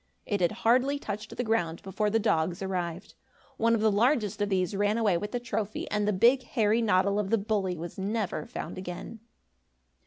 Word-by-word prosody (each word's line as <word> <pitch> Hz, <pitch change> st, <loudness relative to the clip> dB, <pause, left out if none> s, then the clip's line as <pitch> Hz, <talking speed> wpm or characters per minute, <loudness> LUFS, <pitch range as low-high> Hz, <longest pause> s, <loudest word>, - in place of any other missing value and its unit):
It 205 Hz, -3 st, -1 dB
had 175 Hz, -, +3 dB
hardly 255 Hz, +5 st, +4 dB
touched 210 Hz, -5 st, -6 dB
the 245 Hz, -, 0 dB
ground, 190 Hz, -8 st, -1 dB
before 200 Hz, +2 st, -1 dB
the 220 Hz, -, +2 dB
dogs 180 Hz, -3 st, 0 dB
arrived. 180 Hz, -1 st, -4 dB, 0.4 s
One 230 Hz, +1 st, +3 dB
of 220 Hz, -, -1 dB
the 220 Hz, 0 st, +4 dB
largest 215 Hz, -1 st, +1 dB
of 205 Hz, -, +1 dB
these 185 Hz, 0 st, 0 dB
ran 205 Hz, +2 st, +1 dB
away 215 Hz, -5 st, +2 dB
with 205 Hz, +5 st, -3 dB
the 245 Hz, -, -1 dB
trophy 215 Hz, -3 st, -3 dB
and 210 Hz, 0 st, 0 dB
the -, -, +3 dB
big, 235 Hz, +7 st, +4 dB
hairy 225 Hz, -2 st, +1 dB
noddle 200 Hz, -1 st, +2 dB
of 200 Hz, -2 st, -1 dB
the 225 Hz, -, +3 dB
bully 200 Hz, -4 st, -1 dB
was 170 Hz, +3 st, -7 dB
never 210 Hz, +3 st, -2 dB
found 230 Hz, -, -6 dB
again. 185 Hz, +5 st, -7 dB
205 Hz, 195 wpm, -28 LUFS, 190-225 Hz, 0.4 s, hardly